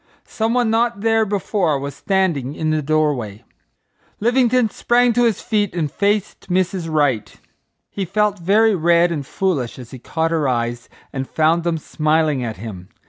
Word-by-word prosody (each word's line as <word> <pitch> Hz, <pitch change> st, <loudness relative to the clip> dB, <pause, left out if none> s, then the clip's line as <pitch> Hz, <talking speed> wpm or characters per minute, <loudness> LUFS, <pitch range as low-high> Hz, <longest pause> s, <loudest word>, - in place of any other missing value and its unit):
Some 225 Hz, +2 st, -1 dB
one 240 Hz, -3 st, +2 dB
not 230 Hz, -2 st, +1 dB
there 225 Hz, 0 st, +2 dB
before 195 Hz, -5 st, 0 dB
was 140 Hz, +1 st, -5 dB
standing 170 Hz, -9 st, -1 dB
in 155 Hz, 0 st, -1 dB
the 155 Hz, 0 st, +1 dB
doorway. 140 Hz, -8 st, -1 dB, 0.8 s
Livingstone 240 Hz, 0 st, +2 dB
sprang 245 Hz, 0 st, +2 dB
to 240 Hz, +1 st, +3 dB
his 225 Hz, -4 st, 0 dB
feet 210 Hz, -5 st, -1 dB
and 155 Hz, -5 st, -1 dB
faced 200 Hz, +3 st, -1 dB
Mrs. 180 Hz, -1 st, 0 dB
Wright. 145 Hz, -8 st, 0 dB, 0.5 s
He 200 Hz, -, -4 dB
felt 205 Hz, +2 st, 0 dB
very 210 Hz, +5 st, +3 dB
red 170 Hz, 0 st, +3 dB
and 150 Hz, -4 st, -2 dB
foolish 140 Hz, -5 st, -2 dB
as 125 Hz, -2 st, -11 dB
he 130 Hz, -, -9 dB
caught 160 Hz, +6 st, -2 dB
her 155 Hz, -4 st, +1 dB
eyes 120 Hz, -1 st, -2 dB, 0.2 s
and 135 Hz, -1 st, -4 dB
found 160 Hz, +2 st, +2 dB
them 170 Hz, -1 st, 0 dB
smiling 155 Hz, -3 st, 0 dB
at 115 Hz, -4 st, -4 dB
him. 95 Hz, -3 st, -8 dB
170 Hz, 165 wpm, -20 LUFS, 140-210 Hz, 0.8 s, to